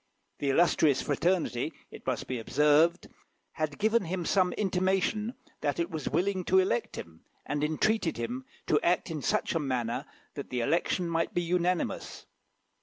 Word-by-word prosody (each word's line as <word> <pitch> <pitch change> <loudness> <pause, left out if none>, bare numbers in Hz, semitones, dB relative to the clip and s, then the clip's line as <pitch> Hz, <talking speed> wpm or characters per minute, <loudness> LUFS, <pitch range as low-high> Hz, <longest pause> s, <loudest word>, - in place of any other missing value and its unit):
The 140 - 0
illustrious 155 -2 +4
fraternity, 160 -2 0 0.2
it - - -12
must - - -1
be 130 -2 -3
observed, 150 +8 +3 0.5
had 155 -2 -3
given 220 0 +2
him 175 +1 -3
some 185 0 +3
intimation 195 +4 0 0.2
that 145 +1 -1
it 170 +2 -1
was 160 -2 -3
willing 185 +2 0
to 190 - +3
elect 215 +4 +1
him, 80 -1 -9 0.2
and 145 0 -2
entreated 165 +4 +1
him 120 +2 -4 0.2
to 150 - +2
act 175 0 +1
in 155 -2 -3
such - - 0
a 165 - +1
manner 125 -5 -2 0.3
that - - -7
the 125 -1 -1
election 170 +6 +1
might 165 0 -1
be 175 - +1
unanimous. 180 +1 -1
170 Hz, 160 wpm, -29 LUFS, 145-185 Hz, 0.5 s, illustrious